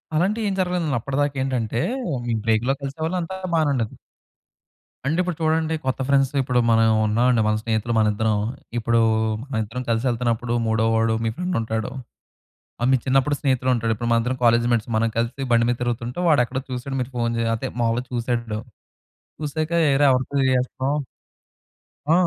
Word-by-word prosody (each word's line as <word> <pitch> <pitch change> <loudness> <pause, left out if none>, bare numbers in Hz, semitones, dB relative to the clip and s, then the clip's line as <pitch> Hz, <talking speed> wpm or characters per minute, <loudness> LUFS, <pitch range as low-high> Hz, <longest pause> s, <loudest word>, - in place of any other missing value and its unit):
అలాంటి 190 +8 +1
ఏం 200 - 0
జరగలేదు. 180 -2 0
అప్పటిదాకా 140 +3 -1
ఏంటంటే 120 -4 -1 0.5
మీ 120 - 0
బ్రేక్‌‌లో 115 +4 +2
కలిసేవాళ్ళు 160 +6 -3
అంతా 175 +3 -5 0.2
బానే 155 -2 +2
ఉండేది. 115 -5 -2 1.1
అంటే 155 +5 0
ఇప్పుడు 180 -3 -2
చూడండి 160 0 +1
కొత్త 130 0 -1
ఫ్రెండ్స్ 135 -1 +3
ఇప్పుడు 125 -1 +1
మనం 115 0 +4 0.2
ఉన్నామండి. 120 +2 +3
మన 110 - +2
స్నేహితులు 115 +1 -1
మన 110 -1 +4
ఇద్దరం. 110 0 +1 0.4
ఇప్పుడు 115 0 +2 0.4
మన 135 -4 -3
ఇద్దరం 120 +4 -5
కలిసి 115 +2 +1
యేళ్తున్నప్పుడు 120 0 -1
మూడోవాడు 110 0 +2
మీ - - +2
ఫ్రెండ్స్ 180 +3 -2
ఉంటాడు. 110 -1 -3 0.9
ఆ - - +2
మీ - - +6
చిన్నప్పుడు 135 +2 +2
స్నేహితుడు 130 -2 +1
ఉంటాడు. 115 -1 0
ఇప్పుడు 120 +2 -3
మన 115 - +5
ఇద్దరం 125 +2 -2
కాలేజ్ 120 0 +4
మేట్స్ 120 -1 0
మనం 115 +1 +2
కలిసి 120 +4 -1
బండి 115 0 +4
మీద 120 - 0
తిరుగుతుంటే 120 +3 -2
వాడు 145 -5 +5
ఎక్కడో 130 +3 -4
చూసాడు 130 +2 -4
మీరు 125 +1 -5
ఫోన్ 120 -1 0
చేసి 115 0 0
అదే 130 +4 -4
మామూలుగా 115 +2 0
చూసాడు. 115 -3 -2 0.8
చూసాక 155 +1 -2 0.2
ఏరా 145 +1 +4
ఎవరితో 130 0 0
తిరిగేస్తనవ్? 130 +2 +1 1.1
ఆ! - - +2
125 Hz, 165 wpm, -23 LUFS, 115-140 Hz, 1.1 s, మీ